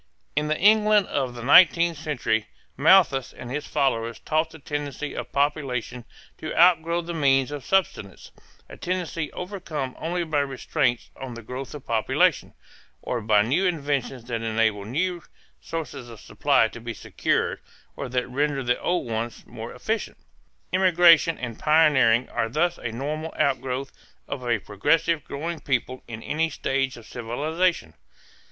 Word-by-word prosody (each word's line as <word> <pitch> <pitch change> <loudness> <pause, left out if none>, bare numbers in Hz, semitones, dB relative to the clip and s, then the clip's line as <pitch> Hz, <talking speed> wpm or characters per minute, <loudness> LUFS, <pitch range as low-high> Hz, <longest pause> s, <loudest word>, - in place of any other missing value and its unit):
In 150 +1 +1
the 155 0 0
England 210 0 +5
of 130 -4 -2
the 120 - -7
nineteenth 170 +4 +6
century 135 -8 -1 0.3
Malthus 145 -3 +4
and 125 - -9
his 150 +3 -4
followers 115 -5 0
taught 155 +1 0
the 160 - -12
tendency 145 -1 -5
of 120 -1 -6
population 135 -4 -1 0.3
to 155 - -4
outgrow 170 -1 +4
the 170 0 -6
means 135 -3 +2
of 145 -3 -6
subsistence 175 - -1 0.4
a - - -11
tendency 175 -3 -3
overcome 170 -8 -5
only 175 +2 -2
by 155 -3 0
restraints 135 -2 -1
on 130 -3 -7
the 115 - -9
growth 125 +5 -7
of 145 - -10
population, 110 -2 +1 0.5
or 120 - -2
by 105 -1 +4
new 155 - +1
inventions 140 -6 -2
that 115 -2 -3
enable 110 -2 0
new 170 - -1 0.4
sources 140 -6 -6
of 115 -2 -11
supply - - +2
to - - -11
be - - -6
secured - - -1 0.4
or 140 - -5
that 125 0 -1
render 140 +1 -1
the 125 0 +1
old 175 -4 -1
ones 115 +1 -4
more 115 0 -8
efficient. 220 - -3 0.6
Emigration 175 -3 +5
and 120 -3 -6
pioneering 145 -7 +4
are 115 - -1
thus 170 +7 0
a 115 - -4
normal 150 +7 -4
outgrowth 135 0 -1 0.4
of 140 -2 -5
a 120 - +3
progressive 160 +9 +1
growing 165 +3 -5
people 130 -1 -2
in 110 -1 -8
any 160 +2 0
stage 135 -4 -1
of 115 - -13
civilization. 155 +11 -1
140 Hz, 150 wpm, -25 LUFS, 120-165 Hz, 0.6 s, nineteenth